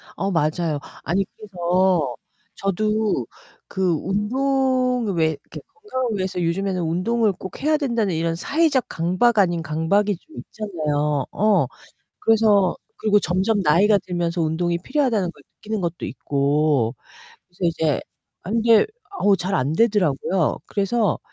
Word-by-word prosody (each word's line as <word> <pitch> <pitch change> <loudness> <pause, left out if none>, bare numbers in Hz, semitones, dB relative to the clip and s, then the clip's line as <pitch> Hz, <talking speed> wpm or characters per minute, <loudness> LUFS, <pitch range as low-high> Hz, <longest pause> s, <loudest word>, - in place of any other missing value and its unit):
어 195 0 -2
맞아요. 155 -1 0 0.2
아니 195 +4 0
그래서 180 - 0 0.4
저도 215 +2 0 0.4
그 190 -2 0
운동을 250 - 0
왜 160 - +3
이렇게 150 - -10
건강을 260 - -3
위해서 185 -1 -2
요즘에는 185 +2 -1
운동을 200 +7 +1
꼭 190 0 -9
해야 305 +2 +2
된다는 235 - 0
이런 165 +1 0
사회적 280 - +1
강박 185 +8 +1
아닌 175 -4 +2
강박이 165 +7 +1
좀 315 - -18
있잖아요. 150 -8 -2
어. 210 0 +3 0.5
그래서 210 -4 +3 0.2
그리고 210 -1 +3
점점 190 +4 +1
나이가 190 +6 +4
들면서 175 -2 -2
운동이 170 +2 0
필요하다는 215 - 0
걸 - - -20
느끼는 215 -2 -4
것도 170 0 -3
있고. 140 -3 0 0.5
그래서 175 - -29
이제 160 -3 +1 0.4
아 185 - -7
근데 225 0 +4 0.4
어 200 -1 +4
잘 185 +2 -2
안되더라고요. 180 - +1
그래서 205 +1 0
190 Hz, 295 characters per minute, -22 LUFS, 165-220 Hz, 0.5 s, 나이가